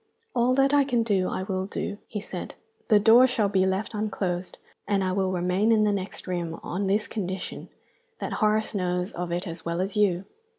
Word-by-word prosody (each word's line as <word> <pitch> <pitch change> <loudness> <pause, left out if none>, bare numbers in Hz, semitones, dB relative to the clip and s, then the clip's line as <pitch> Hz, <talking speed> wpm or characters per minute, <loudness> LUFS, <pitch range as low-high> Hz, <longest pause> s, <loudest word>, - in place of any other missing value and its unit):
"All 245 +1 +3
that 275 +1 +3
I 285 -1 +6
can 245 -4 +1
do 195 -5 +1
I 185 - -3
will 190 0 -2
do," 205 0 -4
he 210 - -4
said. 205 - -7 0.3
"The 210 -2 +6
doors 235 +5 +7
shall 220 -5 +1
be 190 -1 +2
left 190 +4 -1
unclosed, 190 -4 -2 0.3
and 200 -1 +1
I 185 - 0
will 190 0 0
remain 185 +4 +1
in 220 -1 +4
the 210 - +3
next 195 -1 -4
room, 170 -3 -3
on 195 +3 -2
this 205 +3 +1
condition, 190 -3 -5 0.5
that - - -4
Horace 215 +1 +2
knows 180 0 -1
of 175 -4 -4
it 175 +3 -2
as 165 -1 -6
well 170 +1 -2
as 195 +3 -2
you. 195 -3 +2
195 Hz, 205 wpm, -26 LUFS, 185-215 Hz, 0.5 s, doors